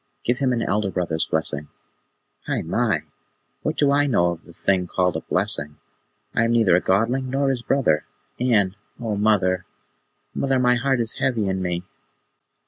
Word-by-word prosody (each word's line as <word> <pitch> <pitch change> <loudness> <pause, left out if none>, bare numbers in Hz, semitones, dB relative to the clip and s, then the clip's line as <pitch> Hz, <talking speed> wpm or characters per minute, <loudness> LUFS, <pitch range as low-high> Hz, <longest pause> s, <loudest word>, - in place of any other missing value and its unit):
Give 120 +1 0
him 130 -2 +2
an 120 -2 0
elder 105 0 0
brother's 85 -4 -1
blessing." 75 -2 -1 0.8
"Hai - - -1
mai! - - 0 0.6
What - - -2
do 145 -1 +3
I 145 +1 +3
know 85 -10 +2
of 85 -1 -8
the 85 - -14
thing 90 +1 0
called 90 0 0
a - - -2
blessing? 75 +1 0 0.6
I 115 - +2
am 115 - +1
neither 110 -7 +4
a 90 - +3
Godling 120 +7 +1
nor 135 +1 +1
his 125 -2 -2
brother, 120 - +1 0.3
and 105 -6 +2 0.2
O 115 -3 -2
mother, 95 -3 +2 0.7
mother, 135 -1 +1
my 125 -1 +4
heart 130 0 +1
is 115 -1 -3
heavy 115 -6 +1
in 95 0 -1
me." 90 -1 -2
105 Hz, 170 wpm, -23 LUFS, 90-125 Hz, 0.8 s, neither